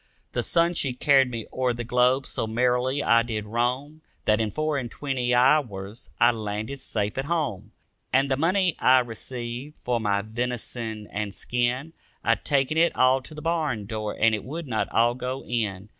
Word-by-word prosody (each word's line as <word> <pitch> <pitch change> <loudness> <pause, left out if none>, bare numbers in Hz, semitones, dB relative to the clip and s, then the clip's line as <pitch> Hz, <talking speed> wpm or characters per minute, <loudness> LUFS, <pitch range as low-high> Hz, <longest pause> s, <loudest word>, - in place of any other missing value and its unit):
The - - -1
sun 170 0 +2
she 140 -6 0
carried 135 0 +4
me 115 -3 -5
o'er 130 -1 +1
the 120 0 -4
globe, 125 +3 +2
so 110 - -2
merrily 125 +4 +1
I 115 0 +5
did 110 -3 -3
roam 125 +7 -2 0.2
That 105 +1 +3
in 110 - 0
four 155 +4 -1
and 120 -3 -5
twenty 130 -2 -2
hours 120 -6 +1
I 120 - +6
landed 110 +4 -4
safe 105 0 -2
at 135 - -2
home. 130 - -2 0.4
And 135 +2 +3
the 135 - +1
money 180 +4 +2
I 130 +1 +6
received 120 +3 -6
for 120 -1 0
my 100 -2 0
venison 115 -1 -4
and 105 -2 -3
skin, 125 +6 -1 0.3
I - - +4
taken 145 +1 +1
it 170 +1 +3
all 130 +1 +4
to 155 +4 -11
the 150 - -8
barn 155 -10 -1
door 110 0 -4
and 110 0 +4
it 105 - -2
would 160 +6 -6
not 110 -3 -1
all 120 +1 +3
go 130 +1 -4
in. 105 -4 -2
125 Hz, 185 wpm, -25 LUFS, 110-140 Hz, 0.4 s, I